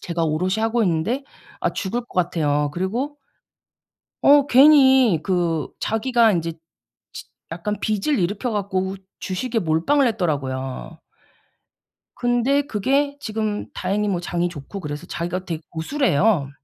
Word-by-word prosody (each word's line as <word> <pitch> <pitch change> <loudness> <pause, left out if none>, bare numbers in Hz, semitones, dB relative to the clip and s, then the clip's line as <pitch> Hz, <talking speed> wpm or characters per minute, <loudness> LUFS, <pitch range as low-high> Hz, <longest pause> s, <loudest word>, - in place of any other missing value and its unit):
제가 170 -1 -2
오롯이 180 +6 0
하고 225 +1 +1
있는데 190 - 0 0.4
아 - - +1
죽을 225 +5 -2
것 - - -24
같아요. 150 -5 +1
그리고 235 - -3 1.1
어 285 0 +6
괜히 265 - +6
그 170 -4 0
자기가 230 0 +2
인제 165 -2 -1 0.6
지 - - -8 0.3
약간 185 +5 -3
빚을 215 +8 0
일으켜 205 +7 -1
갖고 190 -2 -2 0.2
주식에 225 +5 -2
몰빵을 180 - +2
했더라고요. 145 - -3 1.2
근데 245 +3 +2
그게 280 +4 0
지금 215 -3 -3
다행히 200 +3 -1
뭐 190 -4 0
장이 175 0 -1
좋고 170 +5 -8
그래서 150 0 -6
자기가 175 +2 -4
되게 165 -3 -4
고수래요. 175 - +1
195 Hz, 275 characters per minute, -22 LUFS, 170-245 Hz, 1.2 s, 어